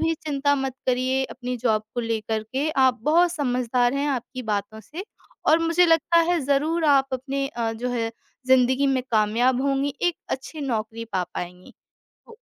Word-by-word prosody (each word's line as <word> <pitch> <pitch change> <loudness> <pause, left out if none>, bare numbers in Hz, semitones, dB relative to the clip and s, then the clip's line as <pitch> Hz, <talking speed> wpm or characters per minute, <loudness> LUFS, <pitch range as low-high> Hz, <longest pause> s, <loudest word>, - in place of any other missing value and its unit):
भी 325 0 +1
चिंता 285 -2 0
मत 270 -2 -2
करिए 255 +1 +1
अपनी 250 -1 -5
जॉब 220 -3 +1
को 245 - -1
लेकर 220 -1 -2
के। 265 +7 -2
आप 260 -3 +3
बहुत 340 +4 +3
समझदार 250 -4 0
हैं 280 +1 0
आपकी 255 -1 -4
बातों 215 0 -3
से 325 - -8 0.4
और 320 - +6
मुझे 335 +2 +3
लगता 330 +1 +3
है 350 - +2
ज़रूर 305 +4 +1
आप 275 -2 +4
अपने 275 +2 -2
अ, 230 -3 -2
जो 235 +3 -4
है 230 -2 -1 0.4
ज़िंदगी 260 +1 +4
में 265 -2 +1
कामयाब 235 +4 +2
होंगी, 275 0 0
एक 350 -1 +1
अच्छी 285 +4 -5
नौकरी 230 -4 -3
पा 185 -1 0
पाएँगी। 180 +1 -7 0.5
हो 455 - -14
260 Hz, 175 wpm, -24 LUFS, 235-285 Hz, 0.5 s, और